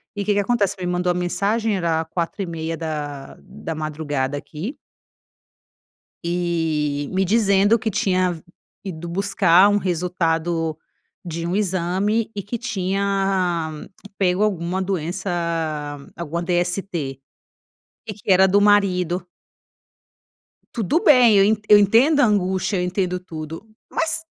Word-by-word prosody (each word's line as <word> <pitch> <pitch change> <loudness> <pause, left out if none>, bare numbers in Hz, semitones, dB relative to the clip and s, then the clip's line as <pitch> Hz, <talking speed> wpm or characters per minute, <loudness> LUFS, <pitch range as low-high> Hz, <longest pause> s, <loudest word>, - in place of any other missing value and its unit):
e 205 -1 -3
que 210 - +2
que 205 - +1
acontece? 205 -1 +1
Me 180 - -3
mandou 180 0 0
a - - +1
mensagem, 200 +5 0
era 165 -2 0
4:30h 165 -1 -3
da 150 -4 -5
da 165 - -7
madrugada 145 -3 -3
aqui 160 - -6 1.5
e 165 -4 -1
me 190 +1 +2
dizendo 205 +1 +3
que 220 - -1
tinha 185 -3 0 0.4
ido 175 -4 -6
buscar, 190 0 +4
um 205 - +3
resultado 170 -3 -1 0.5
de 165 -1 -4
um 175 - -1
exame 195 +3 0
e 200 - -4
que 220 +5 -4
tinha 195 -5 -1 0.5
pego, 185 +1 +2
alguma 185 -2 -1
doença, 185 0 -3 0.9
alguma 170 0 -4
DST 175 -5 -2 0.9
e 215 - -4
que 205 -1 -3
era 190 +1 +6
do 200 +2 +4
marido. 185 -4 +2 1.5
Tudo 240 - 0
bem 250 -6 +6
eu 205 +3 +4
eu 210 - +9
entendo 235 +10 +4
a - - +6
angústia, 190 -2 0
eu 180 - 0
entendo 180 0 -1
tudo, 165 +2 -8 0.2
mas, 325 0 -1
180 Hz, 125 wpm, -22 LUFS, 170-200 Hz, 1.5 s, eu